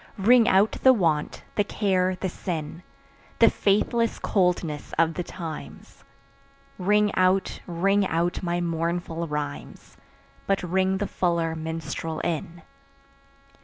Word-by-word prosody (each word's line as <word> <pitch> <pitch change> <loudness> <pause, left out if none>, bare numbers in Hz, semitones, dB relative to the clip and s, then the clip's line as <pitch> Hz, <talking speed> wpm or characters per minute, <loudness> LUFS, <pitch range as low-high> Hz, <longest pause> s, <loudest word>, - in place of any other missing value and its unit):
Ring 230 +4 +5
out 205 -2 +4
the 260 - +7
want, 165 -9 0
the 205 - +2
care 185 -3 0
the 190 - -3
sin, 165 -2 -5 0.6
The - - +6
faithless 225 +3 +1
coldness 175 -6 -1
of 165 0 +3
the 170 - -3
times; 155 - -8 0.8
Ring 210 +2 +2
out, 185 +1 +1
ring 195 +3 +1
out 170 +1 -1
my 175 -1 -1
mournful 170 0 -2
rhymes, 150 -1 -6 0.5
But 195 -1 +1
ring 190 +2 +1
the 205 - -1
fuller 170 -3 0
minstrel 160 0 -4
in. 165 +1 -4
175 Hz, 120 wpm, -25 LUFS, 165-195 Hz, 0.8 s, the